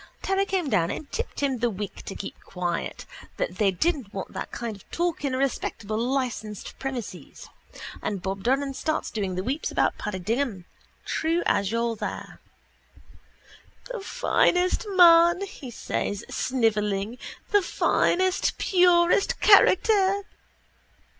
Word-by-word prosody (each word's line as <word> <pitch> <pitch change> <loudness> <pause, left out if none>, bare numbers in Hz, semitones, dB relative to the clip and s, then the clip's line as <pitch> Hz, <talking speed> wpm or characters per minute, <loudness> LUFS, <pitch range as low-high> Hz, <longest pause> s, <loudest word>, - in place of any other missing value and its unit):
Terry 390 +1 +1
came 375 -5 -1
down 175 -9 +2
and 295 - -6
tipped - - -4
him 270 -3 0
the 240 +1 +1
wink 205 -1 -6
to 195 - -6
keep 195 - -7
quiet, 175 -2 -4 0.3
that - - -3
they 205 -2 +4
didn't 260 - -1
want 195 -3 -6
that - - -5
kind 235 -3 -4
of 195 - -18
talk 345 -3 -1
in 270 -2 0
a - - -1
respectable 235 -5 -2
licensed 240 -4 -3
premises. 260 -5 -6 0.5
And 200 - -2
Bob 190 +1 -4
Doran 270 +4 0
starts 310 +3 -2
doing 195 -4 -2
the 185 - -2
weeps 275 +8 -2
about - - 0
Paddy 210 -2 -3
Dignam, 215 0 -2 0.4
true 330 +2 0
as 200 0 +1
you're 230 0 0
there. - - -6 1.5
—The 480 - -4
finest 390 -3 +1
man, 345 -1 +6
says 240 - -4
he, - - -14
snivelling, 215 -3 0 0.3
the 410 - +5
finest 370 0 +1
purest 355 0 +3
character. 400 -1 +5
260 Hz, 135 wpm, -26 LUFS, 210-350 Hz, 1.5 s, man